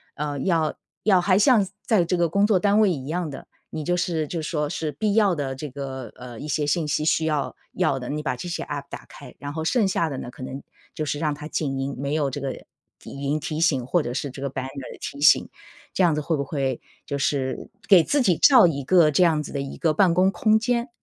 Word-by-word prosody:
呃， 145 -1 -3
要 160 -1 +1 0.3
要 195 -4 +5
还 185 +1 +3
像 215 -4 +4 0.2
在 195 -7 +3
这 180 - 0
个 170 -2 +2
工 200 +4 +3
作 205 -4 +4
单 205 +2 +3
位 205 - +4
一 135 -5 -4
样 170 0 -2
的， 135 - -9 0.2
你 155 - -4
就 175 - +1
是 165 -4 -1
就 165 0 -4
说 150 -2 -2
是 155 -1 -3
必 205 +8 -1
要 205 -4 +4
的 135 -3 -3
这 150 +2 -6
个， 130 -3 -6
呃， 120 -2 -10
一 150 - -6
些 150 0 0
信 155 +1 +1
息 150 +1 0
需 160 0 +2
要 150 -3 -1 0.2
要 135 - +1
的， 125 - -7
你 150 +1 -2
把 130 -3 -1
这 175 +8 -7
些 - - -3
app 145 -1 -5
打 - - -9
开， 140 -3 -13
然 145 0 -6
后 160 0 -3
剩 210 +4 +2
下 170 -4 0
的 135 - -5
呢 120 - -6
可 130 - -10
能 135 +1 -6 0.3
就 155 - -2
是 145 0 -2
让 155 -2 0
它 150 +1 -8
静 135 -4 -2
音， 135 +1 -3
没 140 +2 -3
有 145 -3 +1
这 145 - -5
个 135 - -2
语 - - -12 0.4
音 140 +2 -3
提 155 +1 -4
醒 135 -7 +2
或 170 +3 +1
者 120 - -4
是 140 +2 -3
这 135 - -10
个 140 - -2
banner 135 0 -6
的 - - -10
提 140 - -7
醒。 - - +6 0.5
这 190 - +2
样 170 -3 +4
子 150 - -1
会 155 +1 -1
不 140 - -1
会 135 -3 -2 0.2
就 140 - -3
是 135 -1 -2 0.2
给 185 -5 +7
自 285 - +1
己 180 -8 +3
造 250 -10 +7
一 140 -4 -2
个 170 0 +5
这 180 - +4
样 160 -3 +3
子 - - -8
的 140 - -3
一 140 - -7
个 160 -2 +1
办 175 +1 +4
公 185 +2 +4
空 215 +4 +3
间。 240 +1 -1
150 Hz, 295 characters per minute, -24 LUFS, 140-175 Hz, 0.5 s, 给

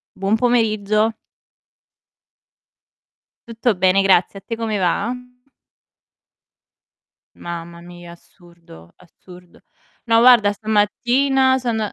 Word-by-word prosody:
Buon 195 +3 -1
pomeriggio. 220 -2 0 2.3
Tutto 230 -1 -1
bene 185 +1 +2
grazie, 195 0 +1
a - - -25
te 230 - -5
come 225 -2 -3
va? 195 +6 -1 2.2
Mamma 170 0 -9
mia, 175 0 -13
assurdo, 170 - -19
assurdo. 180 0 -18 0.4
No, 230 -1 +3
guarda 235 -5 +5
stamattina 245 +6 +1
son 235 -3 -3
205 Hz, 85 wpm, -19 LUFS, 175-230 Hz, 2.3 s, guarda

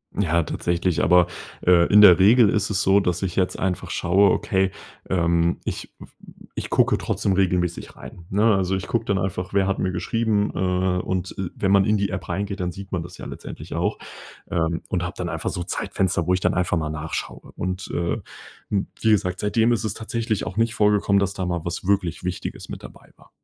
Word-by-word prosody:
Ja, 85 -4 +2
tatsächlich. 85 +2 -1
Aber, 90 -1 +5 0.4
äh, 90 -1 +6
in 105 - +9
der 90 -4 +9
Regel 105 +3 +6
ist 105 -2 0
es 95 -2 0
so, 95 +1 +4
dass 90 -2 -1
ich 90 -2 -2
jetzt 95 -1 0
einfach 95 -1 -2
schaue 95 +2 +3
okay, 95 0 +1 0.4
ähm, 85 -1 +1
ich - - -5
w - - -11 0.5
ich - - -6
gucke - - +3
trotzdem 100 - -1
regelmäßig 90 -2 0
rein, 85 - -11
ne? 105 +1 +4
Also, 95 0 0
ich 95 - -4
gucke 115 -1 -1
dann 100 -1 0
einfach, 90 0 -3
wer 100 -1 +2
hat 95 - 0
mir 95 - -1
geschrieben? 105 +2 0
Äh. 90 0 0
Und, 95 0 -3
äh, 95 -3 -3
wenn 95 - 0
man 100 -1 +5
in 105 0 +2
die 100 0 0
App 95 - -5
reingeht, 100 +3 -3
dann 90 -1 -2
sieht 95 +2 -10
man 90 -3 -2
das 90 +1 -11
ja - - -7
letztendlich - - -8
auch, - - -1 0.5
ähm, 85 -1 -1
und - - -1
habe - - -4
dann - - -3
einfach - - -3
so 90 - -4
Zeitfenster, 85 -1 -1
wo 90 - +2
ich 90 - +1
dann - - +1
einfach 90 -1 +1
mal 80 -1 -2
nachschaue. 75 +1 -5
Und, 95 +1 -4
äh, 85 -1 -1 0.5
m 100 -2 0
wie 110 - +3
gesagt, 90 -3 +1
seitdem 110 +3 +2
ist 115 -5 0
es 110 -2 -2
tatsächlich 110 -1 -3
auch 95 - -6
nicht 115 0 +2
vorgekommen, 105 -2 +3
dass 100 -1 0
da 95 - -3
mal 85 -2 -2
was 85 +2 -5
wirklich 95 -4 0
Wichtiges 90 0 -5
mit - - -7
dabei - - -14
war. - - -21
95 Hz, 215 wpm, -23 LUFS, 90-100 Hz, 0.5 s, in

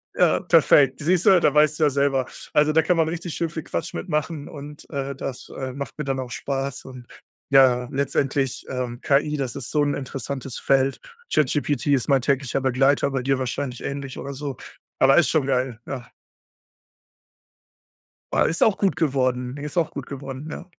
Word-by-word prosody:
Ja, - - +3
perfekt. 135 -2 +4
Siehst 175 +4 +1
du? 185 -3 +6
Da - - +3
weißt 150 0 +4
du - - +3
ja 150 - +5
selber 140 -2 +1 0.3
also, 150 0 +4
da 160 +1 +4
kann 180 +2 +1
man 160 -1 +2
richtig 170 0 -5
schön 165 -1 -1
viel 160 -2 -6
Quatsch 85 - -4
mit 85 - -5
machen. 150 0 -2
Und, 145 0 -10
äh, 140 -2 -3
das, 135 -1 -7
äh, 130 -1 -4
macht 140 +2 -7
mir 150 - -4
dann 135 -1 -1
auch 125 -2 -5
Spaß. 135 0 -4
Und, 130 -2 -10 0.5
ja, 125 -2 +5
letztendlich 135 -1 -1
ähm, 125 -2 -4
KI 150 +2 +2
das 130 -3 -3
ist - - -5
so 150 - +2
'n 145 -1 +1
interessantes 135 -1 -5
Feld. 135 0 +2 0.3
ChatGPT 145 -1 +1
ist 130 - +1
mein 135 -2 +4
täglicher 135 0 0
Begleiter, 135 +2 +2
bei 135 -2 -1
dir 135 0 +1
wahrscheinlich 130 0 -3
ähnlich 135 -1 -5
oder 140 0 -6
so, 140 -1 -5 0.4
aber 135 +3 +5
ist 160 -6 +5
schon 150 -4 +1
geil. 125 -3 0
Ja. 125 -3 -6 2.2
Ah, - - +3
ist 165 - +1
auch 215 - +3
gut 195 -4 +1
geworden. 130 -5 0
Ne, 145 +1 -8
ist 150 +4 -6
auch 160 -2 +1
gut 140 -3 -7
geworden. 135 +1 -7
Ja. - - -7
140 Hz, 190 wpm, -23 LUFS, 130-150 Hz, 2.2 s, du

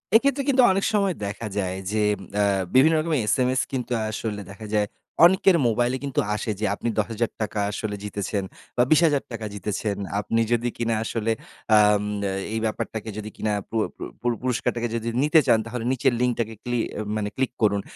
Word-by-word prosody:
এক্ষেত্রে 275 +3 +4
কিন্তু 260 -1 +5
অনেক 195 +1 +1
সময় 200 -3 +2
দেখা 105 +3 -4
যায় 95 -2 -1 0.2
যে 110 0 +1 0.4
আ - - +4 0.3
বিভিন্ন 155 +5 +6
রকমের 155 -2 0
এসএমএস 130 +3 +2
কিন্তু 125 -2 -3 0.2
আসলে 105 -1 -4
দেখা 110 +2 -9
যায় 105 -1 +2 0.4
অনেকের 185 0 +5
মোবাইলে 120 +3 +1
কিন্তু 140 -2 -1 0.2
আসে। 105 +1 -2
যে 110 - 0
"আপনি 120 - -4
৳১০,০০০ 110 -1 -2
আসলে 105 0 -3
জিতেছেন 100 -1 -3 0.3
বা 120 - +5
৳২০,০০০ 145 -8 +2
জিতেছেন। 105 +1 -3 0.2
আপনি 115 +2 0
যদি 120 0 +2
কিনা 115 -1 0
আসলে 115 0 -1 0.5
আম 105 -1 +5 0.3
এ - - -2 0.2
এই 110 - 0
ব্যাপারটাকে 110 0 -3
যদি 110 0 -5
কিনা 105 -1 -1 0.2
পুর 110 -1 +1
পুর - - -5
পুর 120 0 +1
পুরস্কারটাকে 120 -1 -1
যদি 115 0 -3 0.2
নিতে 150 +2 +5
চান 110 - +5
তাহলে 115 0 -5
নিচের 130 0 +2
লিংকটাকে 115 -3 0
ক্লি 120 0 -1 0.2
এ - - -1
মানে 105 -1 -1
ক্লিক 130 -1 0
করুন।" 100 -1 +3
115 Hz, 175 wpm, -24 LUFS, 105-130 Hz, 0.5 s, বিভিন্ন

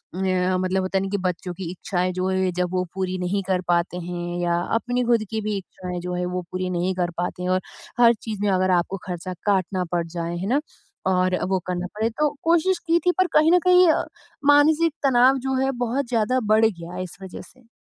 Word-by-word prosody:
न 185 -1 +1
मतलब 185 +1 0
होता 185 +1 -1
है - - +1
ना 195 - -3
कि 200 - -1
बच्चों 180 0 -4
की 175 -1 -6
इच्छाएँ 185 0 -2
जो 185 +1 -1
हैं 190 -1 +1
जब 180 0 -1
वो 180 0 +1
पूरी 185 -1 -2
नहीं 190 +2 -1
कर 185 -1 +1
पाते 175 0 +1
हैं 175 0 -4
या 175 0 +1 0.2
अपनी 245 +1 -1
खुद 235 -2 +3
की 220 -1 -2
भी 210 -1 -2
इच्छाएँ 180 -1 -6
जो 180 0 -4
हैं 180 0 -1
वो 180 - -1
पूरी 185 0 -2
नहीं 180 +1 0
कर 175 -1 -1
पाते 180 +1 -3
हैं 180 - -1
और 185 0 +2 0.4
हर 235 -1 +7
चीज़ 215 -3 -5
में 205 - +2
अगर 185 0 +2
आपको 185 +3 -3
खर्चा 180 0 -4
काटना 190 -2 +1
पड़ 170 -1 0
जाए 170 0 -4
है 190 - -3
ना? 270 +6 +2 0.5
और 185 0 +2
वो 190 - +1
करना 180 0 -2
पड़े 220 +2 0
तो 300 +6 0
कोशिश 340 +3 +2
की 335 +1 +4
थी 360 - +5
पर 370 -1 +3
कहीं 310 +2 +5
न 360 - +6
कहीं 360 -1 +7
अ, - - +1 0.4
मानसिक 295 +2 +5
तनाव 260 0 +5
जो 265 - 0
है 270 - +1
बहुत 255 +3 -1
ज़्यादा 240 +1 +1
बढ़ 220 +1 +5
गया 175 -4 -3
इस 175 -1 -9
वज़ह 190 -1 -8
से। 255 -2 -18
190 Hz, 230 wpm, -23 LUFS, 180-235 Hz, 0.5 s, हर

